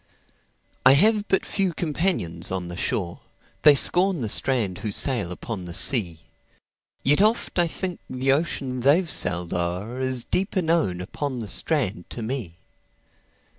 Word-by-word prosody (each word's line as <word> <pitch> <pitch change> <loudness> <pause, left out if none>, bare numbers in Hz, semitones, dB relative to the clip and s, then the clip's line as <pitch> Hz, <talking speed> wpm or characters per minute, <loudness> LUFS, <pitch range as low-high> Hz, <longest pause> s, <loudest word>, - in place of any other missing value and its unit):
I - - +7
have 210 +7 +2
but 190 - 0
few 190 -3 0
companions 155 - -2
on 90 -2 -4
the 85 - -7
shore:They 95 - -1
scorn 180 +3 +4
the 110 - -3
strand 110 -7 +2
who 110 - -4
sail 105 -3 -1
upon 95 +1 -7
the 85 -1 -5
sea; 90 - +5 0.8
Yet 145 +6 +3
oft 215 -3 0
I 175 - +2
think 180 +1 -5
the 130 +1 -1
ocean 135 -3 -2
they've 145 +8 +2
sailed 90 - -2
o'erIs 115 +9 -3
deeper 185 0 -1
known 160 - 0
upon 130 +8 -5
the 115 -3 -6
strand 110 - -2
to 115 - -7
me. 110 -8 -5
130 Hz, 140 wpm, -23 LUFS, -, 0.8 s, I